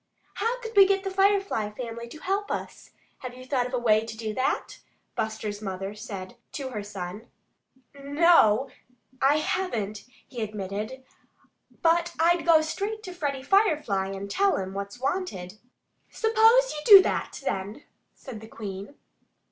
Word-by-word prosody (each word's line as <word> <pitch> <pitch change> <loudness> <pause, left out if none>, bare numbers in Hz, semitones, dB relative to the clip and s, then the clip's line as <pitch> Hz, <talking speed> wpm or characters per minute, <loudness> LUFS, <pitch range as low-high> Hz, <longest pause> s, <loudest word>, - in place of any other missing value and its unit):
"How 480 +2 -1
could 455 -2 -7
we 395 -1 +8
get 390 0 +1
the 385 - -3
Firefly 390 - +2
family 235 +1 -7
to 275 - -11
help 390 +5 -2
us? - - -5 0.3
Have 250 -1 -7
you 255 0 -11
thought 255 -2 0
of 250 - -11
a - - +1
way 220 -3 +3
to 225 -1 -8
do 220 -1 -4
that?" 260 +4 -2 0.4
Buster's 220 -2 -3
mother 195 0 -4
said 200 -3 -8 0.2
to 275 -2 -4
her 215 -5 -4
son. 205 +2 -7 0.7
"N 280 0 -9
no, 285 -8 +5 0.5
I 280 +3 +4
haven't," 230 - -2 0.2
he 250 -3 -7
admitted. 215 +4 -5 0.8
"But 340 +1 +2
I'd 345 +1 +3
go 325 -2 +7
straight 410 +7 -3
to 365 - -7
Freddie 285 -6 -3
Firefly 300 - +2
and 195 0 -5
tell 390 - +2
him 190 0 -4
what's 200 +4 -6
wanted." 230 - -3 0.5
"Suppose 450 +2 +4
you 300 - -5
do 390 +2 +10
that, - - -2
then," 200 +7 -3 0.3
said 235 -5 -9
the 220 - -10
Queen. 205 +2 -8
255 Hz, 155 wpm, -26 LUFS, 210-350 Hz, 0.8 s, do